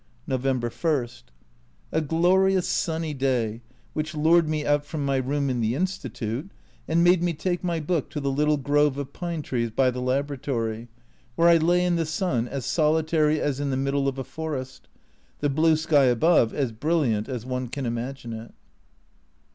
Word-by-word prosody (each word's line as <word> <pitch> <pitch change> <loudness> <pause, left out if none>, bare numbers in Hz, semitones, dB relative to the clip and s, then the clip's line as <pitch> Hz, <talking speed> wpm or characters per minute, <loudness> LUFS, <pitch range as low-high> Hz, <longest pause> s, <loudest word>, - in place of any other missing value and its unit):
November 130 -2 -1
I. 150 -7 +2 0.8
A 160 - +1
glorious 180 +4 +2
sunny 160 -2 -1
day, 125 -5 -1 0.3
which 155 +1 -3
lured 160 +1 +4
me 155 -1 -1
out 145 0 +2
from 145 0 -4
my 135 -1 +1
room 140 +2 -1
in 125 -3 -1
the 110 +2 0
Institute, 140 - -3 0.4
and 165 +1 +3
made 175 0 +5
me 175 -1 +1
take 175 +3 -2
my 170 -2 -1
book 160 -1 -1
to 150 - -4
the 140 -1 -1
little 150 +2 +2
grove 145 0 +2
of 140 -2 -5
pine 170 -3 -4
trees 120 -4 -1
by 130 +3 +2
the 125 0 -5
Laboratory, 130 -4 -2 0.5
where 170 +1 +5
I 170 - +7
lay 175 +2 +2
in 175 -1 +1
the 165 -2 -1
sun, 155 -8 -1
as 135 -1 -5
solitary 155 -1 +2
as 140 -2 -1
in 145 -1 -1
the 130 - 0
middle 140 +1 0
of 135 -1 -2
a 135 - -3
forest 135 -4 -6 0.5
the 145 - +1
blue 160 +3 +4
sky 155 -3 +3
above 125 0 +4
as 135 -5 -1
brilliant 120 -3 0
as 125 -3 -4
one 130 0 -3
can 135 +2 -5
imagine 120 +1 -4
it. 115 +1 -9
145 Hz, 180 wpm, -25 LUFS, 130-160 Hz, 0.8 s, I